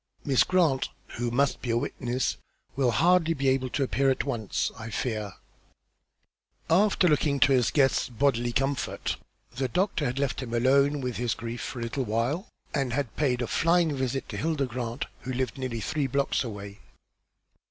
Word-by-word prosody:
Miss 135 -3 +4
Grant, 165 -8 +2 0.2
who 120 +1 -3
must 135 +4 +1
be 125 - -4
a 115 - +2
witness, 125 +1 -1 0.4
will 130 -2 +2
hardly 165 +7 +3
be 135 -1 +1
able 130 -1 +1
to 140 - 0
appear 135 +1 +2
at 130 - +1
once, 115 -8 -2
I 115 - -7
fear," 110 -3 -3 1.3
for, 165 - +2
after 190 0 +4
looking 145 -2 +2
to 140 - +6
his 125 -3 +4
guest's 135 -3 +2
bodily 120 -1 +1
comfort, 135 +3 -1 0.4
the 130 +1 0
doctor 180 - 0
had 125 0 -2
left 140 -1 -1
him 130 - -5
to 120 - +2
be 120 - -1
alone 140 +2 +4
with 125 -2 -3
his 120 -1 0
grief 115 +1 -5
for - - -5
a - - -1
little 125 +3 -2
while, 120 - -1 0.3
and 135 -4 0
had 140 -3 -2
paid 125 -5 +1
a - - 0
flying 165 0 +2
visit 130 0 -2
to - - -5
Hilda 155 -3 0
Grant, 120 0 -4
who 130 - -5
lived 125 -1 -2
nearly 125 -3 -3
three 145 +4 -1
blocks 140 +2 0
away. 100 -3 -7
130 Hz, 185 wpm, -27 LUFS, 120-140 Hz, 1.3 s, to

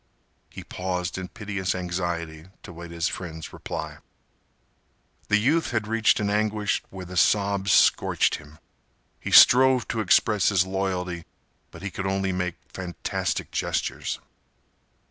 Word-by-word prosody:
He - - -9
paused 90 -1 -3
in 95 - -5
piteous 100 -3 -3
anxiety 85 -3 -4 0.2
to - - -9
await 85 0 -9
his 85 +1 -1
friend's 80 -3 -6
reply. - - -6 1.3
The 105 - +4
youth 145 +10 +2
had 110 -3 -1
reached 115 0 +3
an 105 - 0
anguish 105 0 0
where 95 -1 -8
the 90 +1 -9
sobs 100 +1 +2
scorched - - +3
him. 75 +1 -15 0.6
He - - -5
strove 130 -1 +7
to 115 - -2
express 105 0 +3
his 95 -3 +3
loyalty, 90 -3 -3 0.4
but - - -13
he 100 - -4
could 95 +2 -4
only 95 0 0
make 90 -2 -2 0.2
fantastic 90 -2 -3
gestures. - - -2
95 Hz, 135 wpm, -25 LUFS, 90-105 Hz, 1.3 s, strove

